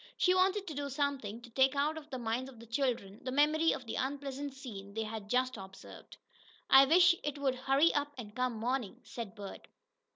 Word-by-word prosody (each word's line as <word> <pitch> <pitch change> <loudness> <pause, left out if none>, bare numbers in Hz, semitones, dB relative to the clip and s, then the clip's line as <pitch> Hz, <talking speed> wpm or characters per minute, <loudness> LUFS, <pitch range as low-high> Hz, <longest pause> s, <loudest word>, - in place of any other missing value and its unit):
She 365 - +4
wanted 380 +2 +2
to 325 - -6
do 285 0 -3
something 270 -6 -2
to 235 - -12
take 265 +3 +3
out 295 +3 +1
of 310 -1 -9
the 260 - -4
minds 240 +2 -2
of 245 -4 -14
the 230 - -11
children 230 -5 -2
the 255 - -3
memory 305 +4 +3
of 255 - -4
the 225 - -4
unpleasant 275 0 -3
scene 200 -7 -9
they 225 - -1
had 215 -1 -6
just 255 0 +1
observed. 195 0 -12 0.5
"I 270 +1 +9
wish 350 +4 +6
it 295 -1 -3
would 275 -2 +1
hurry 270 +5 +3
up 290 0 0
and 215 -3 -8
come 255 -1 0
morning," 235 -1 -2
said 225 -4 -7
Bert. 200 -2 -9
265 Hz, 205 wpm, -33 LUFS, 230-285 Hz, 0.5 s, I